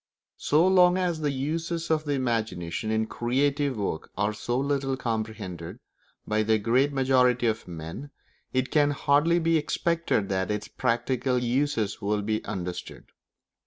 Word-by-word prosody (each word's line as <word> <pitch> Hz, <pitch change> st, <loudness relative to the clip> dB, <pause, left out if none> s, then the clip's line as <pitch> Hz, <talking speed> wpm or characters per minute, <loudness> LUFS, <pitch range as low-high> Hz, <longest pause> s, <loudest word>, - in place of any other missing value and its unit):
So 155 Hz, +5 st, +3 dB
long 180 Hz, -1 st, +5 dB
as 175 Hz, -3 st, 0 dB
the 150 Hz, -, +1 dB
uses 160 Hz, +5 st, -2 dB
of 155 Hz, -1 st, +1 dB
the 145 Hz, -, 0 dB
imagination 110 Hz, -8 st, -2 dB
in 110 Hz, 0 st, +1 dB
creative 135 Hz, +3 st, 0 dB
work 100 Hz, -6 st, -3 dB
are 105 Hz, +2 st, +1 dB
so 120 Hz, +3 st, -2 dB
little 135 Hz, -1 st, 0 dB
comprehended 110 Hz, -8 st, -4 dB, 0.5 s
by 110 Hz, 0 st, +1 dB
the 110 Hz, 0 st, +3 dB
great 125 Hz, +7 st, +2 dB
majority 130 Hz, -2 st, +3 dB
of 110 Hz, -1 st, -1 dB
men, 85 Hz, -, -7 dB, 0.4 s
it 130 Hz, 0 st, -1 dB
can 145 Hz, -2 st, +4 dB
hardly 145 Hz, +4 st, +3 dB
be 165 Hz, -1 st, +2 dB
expected 165 Hz, -8 st, 0 dB
that 95 Hz, -1 st, -1 dB
its 105 Hz, 0 st, -2 dB
practical 125 Hz, +1 st, 0 dB
uses 125 Hz, -4 st, 0 dB
will 105 Hz, 0 st, 0 dB
be 110 Hz, +1 st, -1 dB
understood. 90 Hz, -2 st, -6 dB
125 Hz, 145 wpm, -27 LUFS, 110-145 Hz, 0.5 s, long